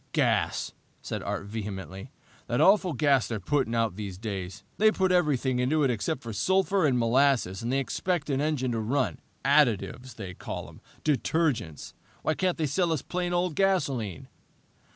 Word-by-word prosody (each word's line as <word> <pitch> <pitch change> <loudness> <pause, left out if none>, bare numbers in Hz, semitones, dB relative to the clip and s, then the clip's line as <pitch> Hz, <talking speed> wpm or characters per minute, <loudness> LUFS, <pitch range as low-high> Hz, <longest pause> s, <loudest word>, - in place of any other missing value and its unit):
"Gas!" - - +1 0.3
said - - -4
Art - - -3
vehemently. 100 - -6 0.4
"The 120 - 0
awful 190 -3 +5
gas 140 -2 +3
they're 115 -2 -3
putting 125 +3 0
out 115 -5 0
these 100 -4 -5
days. 95 -2 -5 0.2
They 215 +1 +6
put 190 -3 +1
everything 140 -7 +2
into 150 +5 +2
it 135 - +3
except 130 +6 -2
sulphur 190 - +2
and 130 -3 +2
molasses, 120 -5 +2
and 115 +2 -2
they 135 - +2
expect 160 +4 -1
an 135 0 +1
engine 145 -5 0
to 115 - -1
run. 130 +5 0 0.3
Additives, 130 -3 +2
they 95 -5 -7
call - - -6
'em! - - -16 0.2
Detergents! 140 - 0 0.3
Why 155 - +2
can't 185 +1 0
they 160 - 0
sell 170 +4 +1
us 155 -4 -1
plain 180 0 -2
old 175 -1 0
gasoline?" 140 - 0
130 Hz, 165 wpm, -28 LUFS, 110-160 Hz, 0.4 s, They